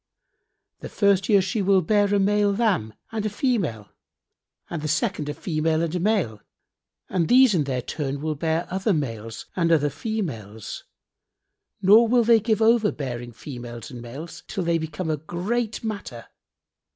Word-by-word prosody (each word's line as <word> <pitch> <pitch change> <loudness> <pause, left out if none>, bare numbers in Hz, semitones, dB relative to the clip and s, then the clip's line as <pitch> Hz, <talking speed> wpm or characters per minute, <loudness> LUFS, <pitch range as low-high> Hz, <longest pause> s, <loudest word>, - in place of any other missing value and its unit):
The - - -7
first 200 -1 +2
year 200 -3 +5
she 195 +3 -1
will 190 -1 +3
bear 205 +3 +2
a 205 - +3
male 205 +1 +3
lamb 195 - 0 0.2
and 220 -2 -2
a 215 - 0
female 195 - -1 0.8
and 170 -3 -5
the 155 - -3
second 160 -1 -1
a - - -2
female 160 -1 0
and 165 -1 -2
a 180 - 0
male 175 - 0 0.7
and 170 -3 0
these 255 -2 +6
in 155 -5 +1
their 130 -3 -2
turn 140 -1 -3
will 155 +1 -2
bear 160 +3 -1
other 195 +3 +1
males 115 -7 -4
and 170 -2 +1
other 145 -3 +3
females, 130 - -5 1.0
nor 215 +5 +7
will 240 +1 +4
they 230 0 +5
give 220 0 +1
over 225 -2 +4
bearing 120 -4 -5
females 120 -1 -8
and 120 -2 -8
males, 140 +8 -8
till 190 - -3
they 170 -1 +1
become 160 +1 -3
a 155 - 0
great 210 +10 -3
matter. 200 - -5
170 Hz, 165 wpm, -24 LUFS, 140-210 Hz, 1.0 s, nor